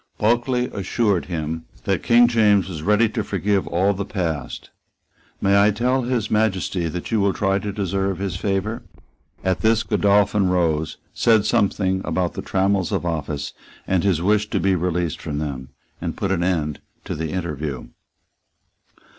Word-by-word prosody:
Bulkeley 120 +3 +1
assured 100 -1 0
him 80 -2 -4 0.2
that - - 0
King 120 +1 +5
James 105 -5 +3
was 80 -5 -6
ready 105 +6 +3
to 110 -1 -2
forgive 100 0 0
all 95 +4 +2
the 100 +1 -3
past. 85 -9 -4 0.7
"May 100 +1 +4
I 105 - +5
tell 125 +5 +1
His 120 -3 -1
Majesty 95 -5 +1
that 90 +6 -5
you 110 - +2
will 100 -1 +2
try 95 -1 +1
to 100 +1 -4
deserve 95 -1 -1
his 95 -2 -3
favour?" 100 +4 -2 0.6
At 95 -1 0
this 110 0 +3
Godolphin 100 -1 +2
rose, 80 -4 0 0.2
said 110 -3 +3
something 100 -4 +1
about 90 -2 -1
the - - -5
trammels 95 -2 0
of - - -1
office 75 -3 -3 0.3
and 95 -2 +1
his 90 -5 +1
wish 105 +2 +2
to - - 0
be 95 0 +2
released 90 -2 -1
from 75 - -4
them, 70 -4 -4 0.3
and 85 -1 -4
put 100 -2 -1
an 90 -3 +1
end 80 -5 0 0.3
to - - -3
the 80 +1 -3
interview. 75 -7 -4
95 Hz, 165 wpm, -22 LUFS, 85-105 Hz, 0.7 s, King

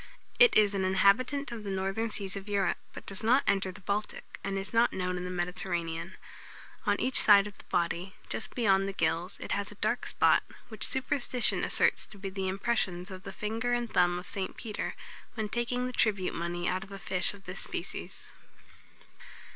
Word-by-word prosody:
It 485 -1 +7
is 210 -1 +5
an 195 -1 0
inhabitant 200 +9 +3
of 230 -2 -6
the 200 - -5
northern 195 +4 -1
seas 200 -2 0
of 200 +1 -7
Europe, 200 -1 +1
but - - -10
does 195 +1 -3
not 245 +5 +4
enter 195 -1 +1
the 185 - -13
Baltic, 205 +2 -4
and 195 0 -2
is 195 +1 -5
not 230 +1 +4
known 180 -1 -2
in 180 0 -4
the - - -4
Mediterranean. 175 -1 -3 0.7
On - - +2
each 260 - +2
side 200 -2 +7
of 205 -2 -8
the - - -14
body, 175 +2 -1
just - - -5
beyond 195 -5 +3
the - - -5
gills, 170 +2 0
it - - -6
has 200 +1 -1
a - - -11
dark 215 +4 -1
spot, - - +4 0.3
which 220 -2 -2
superstition 260 -2 +1
asserts - - +2
to 210 - -14
be 195 -1 -5
the 190 0 -3
impressions 190 -2 -1
of 185 0 -8
the 195 - -7
finger 225 +5 -2
and 240 -1 -1
thumb 175 0 +3
of 180 0 -7
St. 190 -2 +3
Peter, 215 -3 -4 0.4
when 215 -2 -2
taking 240 +2 -1
the 250 - -4
tribute 200 -6 +1
money 175 +1 -3
out 185 +1 0
of 200 - -14
a 195 - -6
fish 190 0 +1
of 195 - -16
this 185 +1 -6
species. - - -5
195 Hz, 200 wpm, -30 LUFS, 185-220 Hz, 0.7 s, It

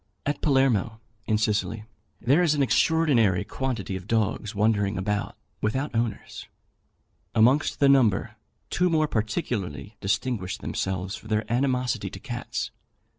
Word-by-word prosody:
At 145 - -1
Palermo, 125 -6 +2 0.3
in 110 - +2
Sicily, 110 0 0 0.4
there 135 +8 +3
is 160 -4 +3
an 145 - +2
extraordinary 130 - +3
quantity 115 -8 -3
of 95 +1 -7
dogs 110 -2 0
wandering 105 -1 +1
about 100 +2 -2 0.3
without 130 +7 -1
owners. 115 -2 -3 0.9
Amongst 130 +7 +3
the 140 - +5
number, 125 -8 +3 0.4
two 180 0 +2
more 155 -2 +2
particularly 105 - -3
distinguished 100 -1 -1
themselves 95 +1 -3
for 110 - -12
their 110 0 0
animosity 125 -1 0
to - - -9
cats. - - -4
110 Hz, 125 wpm, -26 LUFS, 105-135 Hz, 0.9 s, the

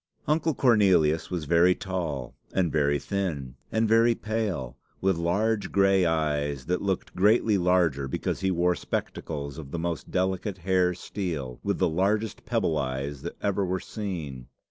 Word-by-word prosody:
Uncle 155 0 +1
Cornelius 95 - +3
was 85 -4 -3
very 85 +3 +4
tall, 85 -10 -4 0.2
and 90 -4 +1
very 75 -1 +2
thin, 80 -10 -3 0.2
and 110 0 +2
very 115 +2 +4
pale, 105 - -3 0.2
with 95 -1 +2
large 100 +6 0
gray 95 -2 +4
eyes 75 -4 -1
that 90 +2 -1
looked 95 -2 -2
greatly 105 +3 +4
larger 90 -7 +2
because - - -2
he 95 - 0
wore 90 0 +2
spectacles 70 -1 -4
of 70 -4 -8
the 75 - -4
most 85 -1 -3
delicate 95 +1 -1
hair 90 0 +1
steel, 80 -10 -4
with - - -1
the - - +2
largest 100 +6 0
pebble 80 -2 +1
eyes 70 +1 -3
that - - -6
ever 100 0 +1
were 95 0 -1
seen. 85 - -5
90 Hz, 155 wpm, -27 LUFS, 75-100 Hz, 0.2 s, very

